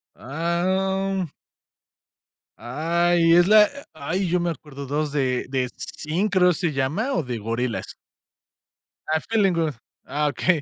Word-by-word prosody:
Ah, 170 +6 -2
om 190 -1 0 1.3
¡Ay! 165 +5 +2
Es 175 0 +6
la 215 0 +8
e - - -5 0.2
¡ay!, 165 +6 -2
yo 180 +1 +1
me 170 0 0
acuerdo 140 -3 -7
2 150 +2 -1
de 130 -3 0
de 130 -1 -1
Zinc, 180 +7 -2
creo 180 -2 +5
se 170 -2 -1
llama 155 - -1
o - - +1
de 125 -4 -4
Gorillaz. 115 +2 -3 1.2
Ah, 155 0 +2
Feeling 200 -5 +3
Good. 160 -3 0 0.3
Ah, 150 +1 -1
okey. 155 +4 +1
165 Hz, 140 wpm, -24 LUFS, 140-185 Hz, 1.3 s, la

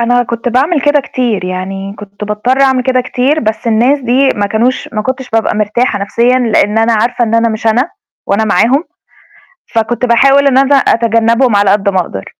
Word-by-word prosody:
أنا 245 +1 +2
كنت 235 0 -4
باعمل 280 +7 +1
كده 290 +1 +2
كتير، 240 -7 -3
يعني 195 +2 -5
كنت 205 0 -9
باضطر 210 +6 -1
أعمل 265 -2 +2
كده 255 0 +1
كتير 260 +4 -1
بس 220 +1 -3
الناس 240 +6 +2
دي 260 +2 +1
ما 205 -1 -1
كانوش 230 +5 -1
ما 215 -2 -2
كنتش 260 +2 -5
بابقى 225 -1 0
مرتاحة 215 +2 -1
نَفْسيًا 235 +5 +1
لإن 225 -3 +1
أنا 225 +1 +2
عارفة 240 +3 0
إن 225 0 -2
أنا 230 0 +2
مش 220 0 -5
أنا، 245 +9 +1 0.4
وأنا 205 +2 0
معاهم، 255 - +1 0.9
فكنت 230 +2 0
باحاول 275 +4 +3
إن 265 -2 +2
أنا 275 +1 +3
أتجنّبهم 230 -1 +2
على 200 -1 +3
قد 200 0 +1
ما 190 -1 0
أقدر، 100 - -5
235 Hz, 190 wpm, -12 LUFS, 215-255 Hz, 0.9 s, باحاول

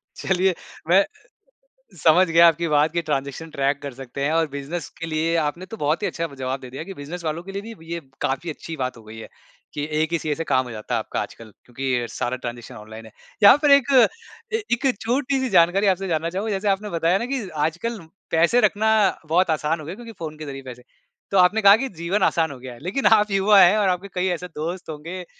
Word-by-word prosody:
चलिए, 190 0 +1 0.4
मैं 195 +3 +5 1.0
समझ 175 +4 +6
गया 170 +1 +6
आपकी 165 +1 0
बात 150 +1 +2
कि 170 - -1
ट्रांज़ेक्शन 145 +1 -3
ट्रैक 140 -1 0
कर 140 -2 -5
सकते 135 +1 -6
हैं, 150 - +1
और 165 0 +2
बिज़नेस 140 +3 -5
के 165 - -4
लिए 165 +1 0
आपने 170 +5 -4
तो 225 +4 -8
बहुत 150 0 0
ही 205 - +1
अच्छा 165 -2 -3
ब 140 - -13
जवाब 130 +1 -2
दे 125 - -10
दिया 135 +4 -6
कि - - -6
बिज़नेस 165 +3 -8
वालों 160 +2 -2
के 195 - -9
लिए 205 +4 -6
भी 165 -3 -11
ये 170 - -3 0.2
काफ़ी 135 +6 -2
अच्छी 160 +1 -7
बात 125 - -4
हो 115 - -14
गई 110 +1 -11
है - - -9 0.5
कि 145 - -2 0.2
1 160 +1 -2
ही 170 - +2
सीए 150 -1 -2
से 165 - -4
काम 130 -4 +1
हो 120 - -8
जाता 110 +2 -5
है 115 - +2
आपका 110 - -3
आजकल 110 -2 -8
क्योंकि 130 +1 -3
अ, 120 - -3
सारा 125 +1 -2
ट्रांज़ेक्शन 120 -2 -7
ऑनलाइन 110 +1 -11
है। 110 - -15 0.3
यहाँ 200 +7 +9
पर 295 - +4
एक 280 -1 +5
अ, 455 - +1
एक 275 - -2
छोटी-सी 260 +2 0
जानकारी 175 +5 +4
आपसे 190 +1 -4
जानना 165 0 -1
चाहूँगा, 200 +5 -3
जैसे 200 +1 -1
आपने 200 +1 0
बताया 170 +4 +2
ना 235 - -3
कि 220 -8 -4 0.2
आजकल 215 +8 -5 0.3
पैसे 170 +10 +3
रखना 220 0 +2 0.4
बहुत 175 +3 +2
आसान 155 +1 0
हो 150 - -9
गया 170 - -5
क्योंकि 230 +1 -10
फ़ोन 155 -2 -6
के 155 - -7
ज़रिए 135 -1 -7
पैसे 125 0 -11 0.5
तो 195 - +2
आपने 190 +4 +4
कहा 200 +1 +8
कि - - -3
जीवन 190 +4 0
आसान 165 -2 0
हो 135 - -8
गया 125 0 -9
है। 120 - -16
लेकिन 200 +10 -1
आप 210 -1 +5
युवा 195 +1 +4
हैं 180 +4 +6
और 205 -2 +2
आपके 185 +2 -1
कई 180 0 0
ऐसे 180 +2 -8
दोस्त 170 +3 -5
होंगे 170 +5 -7
165 Hz, 240 wpm, -23 LUFS, 145-195 Hz, 1.0 s, यहाँ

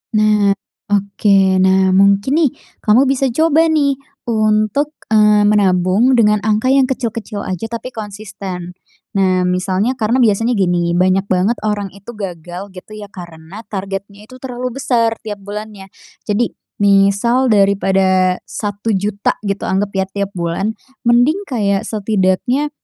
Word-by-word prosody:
Nah, 210 -2 +3 0.3
oke. 200 0 +2 0.2
Nah, 190 0 +3
mungkin 200 +5 +3
nih, 310 -4 +3 0.3
kamu 215 +4 +4
bisa 270 0 +1
coba 320 +5 +2
nih 285 -4 +1 0.3
untuk, 215 +6 +1 0.2
eee, 210 -1 +5
menabung 205 +3 +3
dengan 210 -3 +3
angka 215 +4 +2
yang 270 -1 +4
kecil-kecil 230 -5 -4
aja, 185 +3 -4
tapi 230 +3 -6
konsisten. 200 -5 -7 0.5
Nah, 185 -1 +2
misalnya, 185 +7 0
karena 235 +4 +1
biasanya 225 +2 +2
gini, 175 -3 +1
banyak 185 +2 +2
banget 190 +5 +1
orang 205 -2 -1
itu 200 +4 -11
gagal 180 -1 -7
gitu 190 +3 -12
ya, 210 -1 -8
karena 175 +3 -11
targetnya 200 +1 -6
itu 255 +2 -13
terlalu 250 -1 -5
besar 230 -4 +1
tiap 205 -2 -6
bulannya. 205 -1 -8 0.4
Jadi, 220 +3 0 0.3
misal 200 +6 +3
daripada 190 -2 +2
Rp1.000.000 205 -1 -2
gitu, 200 -1 -3
anggap 195 +2 -1
ya, 190 0 +1
tiap 200 0 -4
bulan, 170 +5 -1 0.4
mending 245 +10 +3
kayak 200 -6 0
setidaknya, 215 +6 0
205 Hz, 130 wpm, -16 LUFS, 195-230 Hz, 0.5 s, eee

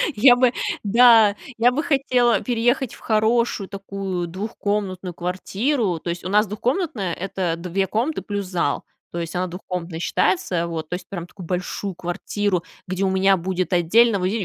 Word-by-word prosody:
Я 245 +3 +7
бы 250 -1 +3 0.3
да, 225 -1 +6 0.2
я 240 +2 +4
бы 295 +5 -1
хотела 255 -5 +2
переехать 245 +1 0
в - - -13
хорошую 220 -2 +1
такую 195 -3 -4
двухкомнатную 195 -1 -3
квартиру. 190 - -1
То 170 - -6
есть, 170 0 -4
у 185 - -4
нас 210 +2 +3
двухкомнатная- 215 - -1
это 185 -2 -2
2 185 +3 -1
комнаты 250 +9 -1
плюс 205 -2 -4
зал. 175 -6 -1 0.3
То 170 - -3
есть, 165 +1 -5
она 185 +1 0
двухкомнатной 175 -2 -5
считается, 175 -1 0
вот. 160 -2 -5
То 180 - -2
есть, 180 0 -9
прям 175 -3 -6
такую 180 -2 -11
большую 180 +1 -3
квартиру, 180 +1 -2 0.2
где 185 +2 -2
у 190 - +2
меня 190 0 +3
будет 185 +1 -2
отдельно, 200 +5 +4
во, - - -4
ви 220 +4 -1
195 Hz, 170 wpm, -22 LUFS, 180-225 Hz, 0.3 s, Я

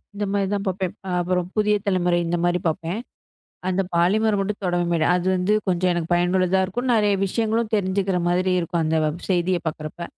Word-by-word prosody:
இந்த 205 +1 -2
மாரித 200 0 0
பாப்பேன் 185 -1 -2 0.3
அப்புறம் 180 0 0
புதிய 210 0 +3
தலைமுறை 180 -2 +2
இந்தமாரி 175 +1 +1
பாப்பேன். 165 +5 -3 0.7
அந்த 185 +1 +1
பாலிமர் 205 +5 +2
மட்டும் 200 +1 -2
தொடவே 175 -1 0 0.2
அது 180 0 0
வந்து 185 +3 +1
கொஞ்சம் 180 0 +1
எனக்கு 170 -1 -3
பயனுள்ளதா 180 +2 +2
இருக்கும் 245 +7 -3
நெறைய 210 -2 +3
விஷியங்களும் 225 +2 -1
தெரிஞ்சுக்குற 190 -1 0
மாரி 185 +1 +1
இருக்கும் 170 0 -1
அந்த 160 +1 +1
வப் 155 +3 -4
செய்தி 185 0 +2
பாக்கரப்ப 155 +2 -5
185 Hz, 160 wpm, -23 LUFS, 175-200 Hz, 0.7 s, புதிய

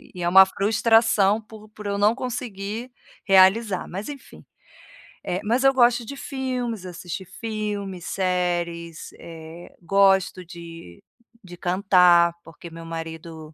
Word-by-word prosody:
e 180 - -5
é 175 - +1
uma 190 +2 +8
frustração 215 +1 +2
por 215 0 -14
por 210 0 -13
eu 200 0 -2
não 210 +3 +3
conseguir 235 -3 -5 0.4
realizar, 195 +1 +4
mas 195 +4 -6
enfim. 285 -2 -11 0.8
Eh, 180 +2 -2
mas 235 +5 0
eu 270 - +5
gosto 240 -2 +3
de 280 - -7
filmes, 250 -7 -4
assistir 180 +1 -7
filmes, 205 -2 -5
séries, 175 -3 -2
eh, 165 +1 -12
gosto 190 0 +2
de 165 - -12 0.4
de 175 -2 -12
cantar, 180 -2 +4
porque 165 +1 -12
meu 165 0 -10
marido, 160 -1 -8
190 Hz, 130 wpm, -23 LUFS, 170-220 Hz, 0.8 s, uma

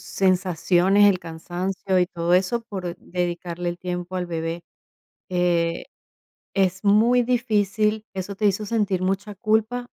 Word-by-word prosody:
sensaciones, 185 +1 +3
el 185 - 0
cansancio 180 +3 -3
y 180 - +3
todo 170 0 -2
eso, 185 +6 +2
por 185 -5 -6
dedicarle 175 -1 -3
el 175 - -7
tiempo 180 0 -5
al 180 -1 -2
bebé, 165 0 -4 0.7
eh, 175 -2 0 0.7
es 190 -1 +1
muy 220 +5 +4
difícil. 215 -3 +1
¿Eso 195 +1 -5
te 210 +1 +2
hizo 205 +2 0
sentir 200 -4 0
mucha 200 +2 -2
culpa? 220 +4 0
185 Hz, 130 wpm, -23 LUFS, 175-210 Hz, 0.7 s, muy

